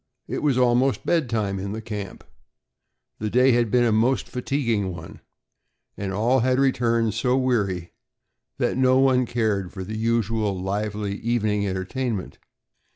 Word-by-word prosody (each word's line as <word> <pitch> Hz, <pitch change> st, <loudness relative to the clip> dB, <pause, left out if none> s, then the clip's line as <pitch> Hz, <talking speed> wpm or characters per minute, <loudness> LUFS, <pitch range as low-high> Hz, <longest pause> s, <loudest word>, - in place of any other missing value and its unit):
It -, -, -3 dB
was 145 Hz, -4 st, +2 dB
almost 125 Hz, +1 st, +2 dB
bed 160 Hz, -7 st, +1 dB
time 105 Hz, -4 st, -1 dB
in 100 Hz, +1 st, -4 dB
the 110 Hz, -, -4 dB
camp. 105 Hz, -4 st, -7 dB, 1.0 s
The 110 Hz, -, -2 dB
day 125 Hz, +4 st, +4 dB
had 120 Hz, -2 st, +2 dB
been 120 Hz, +3 st, +3 dB
a 120 Hz, -, +3 dB
most 115 Hz, +5 st, +2 dB
fatiguing 120 Hz, -6 st, -1 dB
one, 85 Hz, -2 st, -10 dB, 0.8 s
and 100 Hz, -1 st, -4 dB
all 115 Hz, +7 st, +2 dB
had 130 Hz, +1 st, +2 dB
returned 115 Hz, -5 st, +2 dB
so 125 Hz, +3 st, +1 dB
weary 100 Hz, -9 st, 0 dB, 0.7 s
that -, -, 0 dB
no 130 Hz, 0 st, +4 dB
one 130 Hz, -2 st, +3 dB
cared 105 Hz, -6 st, -1 dB
for 95 Hz, -, -6 dB
the 110 Hz, +4 st, -6 dB
usual 110 Hz, -3 st, 0 dB
lively 100 Hz, +1 st, -3 dB
evening 105 Hz, -3 st, 0 dB
entertainment. 95 Hz, +3 st, -3 dB
115 Hz, 150 wpm, -24 LUFS, 100-125 Hz, 1.0 s, day